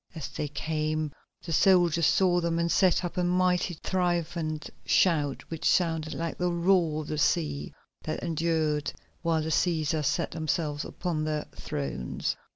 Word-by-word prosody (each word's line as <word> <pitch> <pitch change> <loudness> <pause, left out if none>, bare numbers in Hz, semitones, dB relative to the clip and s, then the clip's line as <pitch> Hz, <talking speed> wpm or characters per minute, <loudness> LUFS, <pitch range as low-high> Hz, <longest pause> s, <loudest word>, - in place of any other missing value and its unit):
As 160 - -5
they 150 - -3
came 155 +1 -2 0.3
the 165 - -3
soldiers 175 -2 +4
saw 180 -2 +3
them 170 0 0
and 170 0 +1
set 185 -1 +3
up 175 - -5
a 180 - +2
mighty 180 0 +2
triumphant 170 -3 -1 0.2
shout 150 -6 +2
which 160 - 0
sounded 160 -3 +1
like 165 -1 -4
the 180 0 +1
roar 170 -3 +2
of - - -11
the 155 - -2
sea, 150 -2 0 0.3
that 155 - -4
endured 160 -3 0 0.3
while 165 -2 +1
the 160 - -3
Cæsars 155 -2 +1
sat 140 - 0
themselves 155 -2 -2
upon 170 -4 -3
their 155 -1 -2
thrones. 70 -3 -3
160 Hz, 155 wpm, -28 LUFS, 155-175 Hz, 0.3 s, soldiers